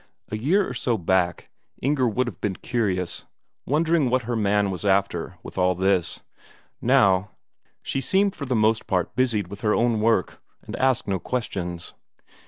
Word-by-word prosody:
A - - -3
year 175 - +2
or - - -5
so 120 -3 0
back, 90 -1 0 0.3
Inger 135 -1 +1
would 125 +4 0
have 115 -8 -7
been 100 -3 -1
curious, 95 -8 -2 0.4
wondering 160 -1 +2
what 130 0 +1
her 120 +2 -2
man 105 -2 +1
was 90 - -5
after 95 -3 0
with - - -7
all 90 0 +3
this 95 -1 +1 0.6
now, 95 +1 +3 0.5
she 135 - -2
seemed 195 +5 +2
for 140 - -5
the 125 -1 -1
most 110 0 +2
part 90 0 -1
busied 115 -6 +1
with 100 +2 -9
her 105 -2 +2
own 115 -2 +2
work, 110 -4 +1 0.2
and - - -7
asked 130 -2 +1
no 95 -2 0
questions. 90 -7 -4
105 Hz, 170 wpm, -24 LUFS, 95-125 Hz, 0.6 s, all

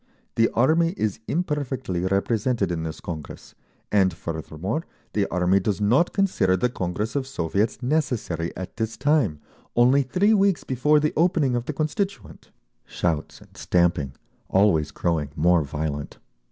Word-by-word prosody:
The 115 0 +3
Army 165 +8 +3
is 110 -2 -1
imperfectly 140 - -2
represented 100 +4 0
in 85 -2 -2
this 80 0 -5
Congress, 80 -4 -8 0.4
and 95 -3 +4
furthermore, 85 - -4 0.3
the 105 -2 +1
Army 90 +2 +2
does 100 +1 -1
not 120 +12 +3
consider 105 - +2
the 125 +7 +1
Congress 105 +3 -3
of 135 -2 -1
Soviets 105 +2 -1
necessary 120 - -1
at 95 +3 -7
this 110 -1 -3
time, 140 - +2 0.4
only 125 +4 +5
three 185 +11 +2
weeks 200 -3 +2
before 150 +4 +2
the 150 +1 0
opening 160 -6 +2
of 120 0 -2
the 155 - -3
Constituent—" 190 +7 -3 0.3
shouts 80 -4 -3
and - - -19
stamping, 85 -7 +1 0.4
always 95 -6 +3
growing 80 -5 -1
more 85 +2 +4
violent. 75 0 -4
105 Hz, 140 wpm, -24 LUFS, 85-140 Hz, 0.4 s, only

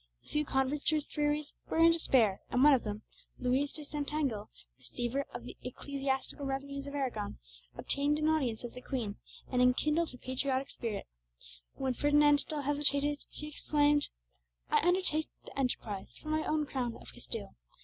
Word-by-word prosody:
The - - -18
few 300 0 0
converts 270 +2 0
to 315 - +4
his 300 -1 0
theories 295 0 -1 0.2
were - - -1
in 330 0 +7
despair, 245 -11 +3
and 250 - +3
one 295 0 +8
of 260 - +3
them, 210 0 -4 0.3
Luis 260 +3 +1
de 300 - -6
Santangel, 285 -7 -2 0.3
receiver 250 +3 -3
of 120 - -7
the 125 - -8
ecclesiastical 270 +2 -3
revenues 275 +1 -4
of 280 - -6
Aragon, 250 -7 -2 0.4
obtained 285 +1 +2
an 305 0 +1
audience 265 -9 +1
of 240 - -6
the 250 - -9
Queen, 235 -7 -3 0.3
and 250 -1 +2
enkindled 300 +6 +3
her 250 - -9
patriotic 260 +1 -1
spirit. 215 -4 -4 0.7
When 265 -1 -1
Ferdinand 290 +2 +5
still 300 0 -1
hesitated, 290 0 +2
she 300 - -6
exclaimed, 295 0 +2 0.6
"I - - +5
undertake 350 -3 +3 0.2
the - - -11
enterprise 220 -6 -2
for 310 - -8
my 310 0 +1
own 305 -1 +1
crown 250 -4 -2
of - - -12
Castile. - - -6
280 Hz, 170 wpm, -32 LUFS, 250-295 Hz, 0.7 s, one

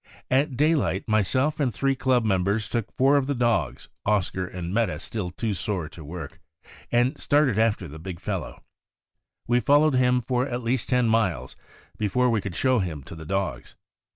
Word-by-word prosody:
At 135 0 +2
daylight, 150 - +1
myself 130 +8 +1
and 135 -4 +1
three 135 +5 0
club 130 -3 +1
members 100 +2 +1
took 115 -3 -3
four 135 +2 +3
of 135 -2 0
ttie 140 -2 -1
dogs 115 - 0 0.2
(Oscar 95 -3 0
and 90 0 -6
Meta 115 +1 +1
being - - -5
still 105 -6 -4
too 105 +4 -3
sore 95 -3 -2
to 80 - -11
work) 80 0 -8 0.5
and 125 +5 +2
started 145 -7 +2
after 110 -5 +1
the 80 +2 -10
big 85 +1 -7
fellow. 95 -2 -5 0.8
We 120 +1 +2
fol 145 +4 +4
lowed 155 -2 +3
him 125 -1 +3
for 125 +2 0
at 125 -2 -4
least 120 0 -1
ten 125 -2 +3
miles 95 - 0 0.4
before 120 +4 +2
we 110 -3 +1
could 95 -3 -6
show 130 +5 +2
him 80 -7 -3
to 85 - -10
the 80 -1 -10
dogs. 95 -10 -3
110 Hz, 185 wpm, -25 LUFS, 95-130 Hz, 0.8 s, fol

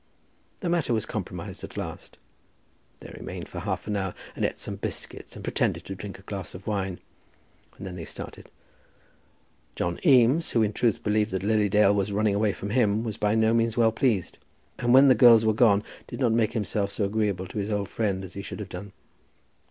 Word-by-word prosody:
The 180 - -1
matter 165 -9 +1
was 110 - -1
compromised - - -6
at - - -8
last. - - -7 0.8
They - - -11
remained - - -7
for - - -7
half - - -3
an 105 - -2
hour, 95 -2 -2 0.2
and - - -3
ate - - 0
some - - -6
biscuits - - -6
and - - -9
pretended - - -1
to 95 - -5
drink 95 +1 -8
a 95 - -17
glass 95 -3 -6
of 95 - -10
wine, 95 -4 -2 0.8
and - - -8
then 90 -1 -6
they 80 - -6
started. - - -8 1.3
John 85 0 -2
Eames, 135 +1 +5
who 115 - +2
in 105 0 0
truth 115 -2 +1
believed 105 0 +1
that 95 -2 -3
Lily 105 0 +2
Dale 105 0 +5
was 100 0 0
running 105 0 +1
away 105 +1 +2
from 100 +1 -6
him, 110 -2 +2
was 110 -2 -4
by 105 +1 +1
no 110 0 +3
means 115 0 +1
well 115 -1 +4
pleased, 110 -5 0 0.4
and 120 - +1
when 135 +2 +8
the 130 - +8
girls 115 -1 +7
were 110 - +4
gone, 105 -2 +4 0.2
did 120 - -7
not 125 -4 +2
make 110 -2 +2
himself 105 -2 -1
so 100 - -1
agreeable 100 -3 -1
to 95 - -5
his 100 +1 -2
old 105 -2 -1
friend 95 -2 -1
as 95 -2 -9
he 100 - -5
should 100 - -7
have 100 -2 -6
done. 95 +2 -8
105 Hz, 210 wpm, -26 LUFS, 100-115 Hz, 1.3 s, when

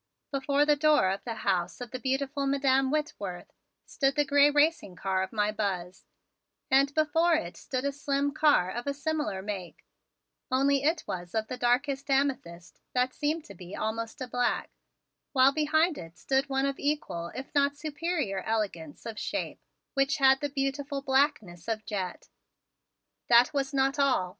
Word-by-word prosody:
Before 280 +1 +1
the 295 0 +4
door 295 -10 +4
of 195 - -4
the 230 -2 -3
house 180 -2 0
of 245 -2 -7
the 255 - -5
beautiful 275 +2 -1
Madam 270 -1 +2
Whitworth 210 -12 -4 0.3
stood 275 -1 0
the 295 - +2
gray 285 +1 +5
racing 295 - +2
car 190 0 -1
of 190 - -3
my 210 -1 +1
Buzz, 190 -4 -4 0.6
and 275 +1 +5
before 320 +2 +3
it 175 - -3
stood 255 +1 -4
a 280 - +1
slim 280 0 -1
car 295 -12 +3
of 240 +3 -5
a 280 - -1
similar 295 -9 -2
make, 195 -4 -6 0.6
only 275 +1 +2
it 310 +3 +1
was 175 +1 -6
of 220 0 -1
the 255 - -3
darkest 270 +3 0
amethyst 255 -12 -1 0.2
that 250 +1 +1
seemed 305 +2 -2
to 200 - -11
be 180 0 -10
almost 225 +2 -4
a 255 - -3
black, 245 0 -1 0.6
while 265 0 +6
behind 315 +2 +2
it 165 0 -11
stood 270 +1 0
one 270 0 +1
of 275 -1 -2
equal 285 - -2
if 265 +1 -7
not 285 0 +2
superior 305 - -2
elegance 190 -9 -3
of 225 -2 -5
shape - - -3 0.3
which 275 +1 +1
had 270 -1 +5
the 290 - -1
beautiful 275 0 -2
blackness 265 - 0
of 220 -1 -2
jet. 190 -4 -4 1.0
That 240 +3 +6
was 275 -1 -1
not 270 +1 +1
all! 265 -10 +2
270 Hz, 165 wpm, -28 LUFS, 215-285 Hz, 1.0 s, while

